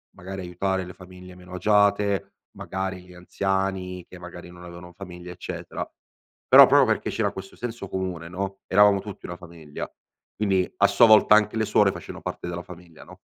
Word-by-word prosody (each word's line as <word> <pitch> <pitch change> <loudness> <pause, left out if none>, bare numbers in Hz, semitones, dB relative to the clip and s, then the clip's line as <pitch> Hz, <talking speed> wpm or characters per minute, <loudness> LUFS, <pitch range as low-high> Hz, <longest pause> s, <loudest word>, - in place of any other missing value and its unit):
magari 95 +1 -7
aiutare 95 +2 -2
le 90 - -10
famiglie 90 0 -13
meno 90 0 -14
agiate, 100 +1 +2 0.2
magari 95 -1 -4
li 90 - -15
anziani 95 0 -3
che 90 - -11
magari 90 0 -10
non 90 0 -13
avevano 90 0 -11
famiglia 90 -1 -10
eccetera. 90 - -6 0.6
Però - - +10
proprio - - +5
perché - - 0
c'era - - -1
questo 95 0 -10
senso 120 -4 -6
comune 90 -3 -4
no, 95 +2 -5
eravamo 100 0 +5
tutti 100 0 -9
una 85 - -7
famiglia, 85 -4 -9 0.5
quindi 95 -3 0
a 100 - +5
sua 115 +4 +5
volta 110 -1 +6
anche 105 0 +2
le 110 - +1
suore - - +3
facevano - - -9
parte - - -6
della 85 0 -5
famiglia, 90 -2 -14
no? - - -14
95 Hz, 175 wpm, -24 LUFS, 90-100 Hz, 0.6 s, Però